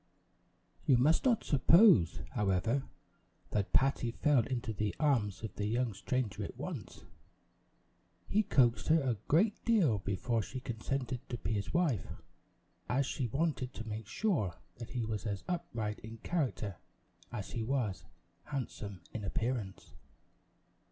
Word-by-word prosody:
You 130 - +6
must 150 - +3
not 240 -4 +3
suppose, 150 - +6
however, 105 +4 +1 0.7
that 100 -2 0
Patty 135 -3 +3
fell 135 +1 +3
into 120 -3 -2
the 105 0 -2
arms 115 -10 +1
of 110 -4 -4
the 105 - -2
young 120 +1 0
stranger 115 +1 -2
at - - -7
once. - - -6 1.2
He 210 - +3
coaxed 125 - +3
her 160 +1 +5
a 125 -7 -1
great 200 +8 +3
deal 180 - +3
before 100 +4 -1
she 130 +6 -6
consented 125 +1 -3
to 120 - -3
be 100 - -3
his 100 -2 -2
wife; 165 - +1 0.8
as 135 +2 +2
she 130 -2 -2
wanted 135 0 -1
to 115 - -6
make 110 -1 -5
sure 135 - 0 0.2
that 115 -1 -7
he 120 -3 -2
was 110 0 -3
as 100 -2 -3
upright 115 -12 -3
in 110 +1 -9
character 120 - -2 0.5
as 105 -5 -5
he 115 - -3
was 115 -4 -1 0.4
handsome 105 - -5
in 110 - -4
appearance. 110 -1 -3
120 Hz, 140 wpm, -33 LUFS, 105-140 Hz, 1.2 s, You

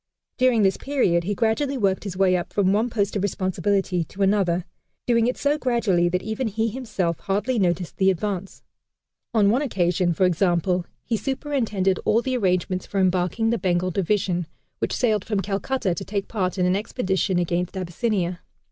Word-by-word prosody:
During 250 -4 +4
this 195 -1 +3
period 190 -12 +1
he 205 +2 -1
gradually 250 +6 0
worked 195 -3 0
his 185 -3 -5
way 190 -1 +4
up 175 - -3
from 195 -2 +2
one 220 +4 +1
post 205 -3 -1
of 200 - 0
responsibility 190 -1 0
to 195 +6 -3
another, 190 -3 +2 0.4
doing 230 -1 +3
it 250 - -1
so 290 +1 +1
gradually 215 -10 +2
that 180 +1 -1
even 220 +4 -2
he 220 +2 0
himself 200 -9 -2
hardly 210 +5 -1
noticed 175 -2 0
the 190 0 +4
advance. 190 0 -3 0.7
On 205 -3 +4
one 250 +5 +2
occasion, 180 - +1
for 185 +3 +2
example, 180 0 +1 0.2
he 230 - -1
superintended 225 -7 -1
all 230 +2 +2
the 260 -1 -1
arrangements 185 -4 0
for 200 - -2
embarking 185 +4 +1
the 235 - 0
Bengal 180 -1 0
Division, 185 -2 0 0.3
which - - -1
sailed 215 -5 +1
from 210 -3 -1
Calcutta 200 +1 -1
to 185 - -5
take 200 0 -3
part 190 -4 -2
in 180 - +2
an 180 +1 +2
expedition 190 -3 -1
against 175 +2 -1
Abyssinia. 185 -1 -1
195 Hz, 175 wpm, -24 LUFS, 180-225 Hz, 0.7 s, During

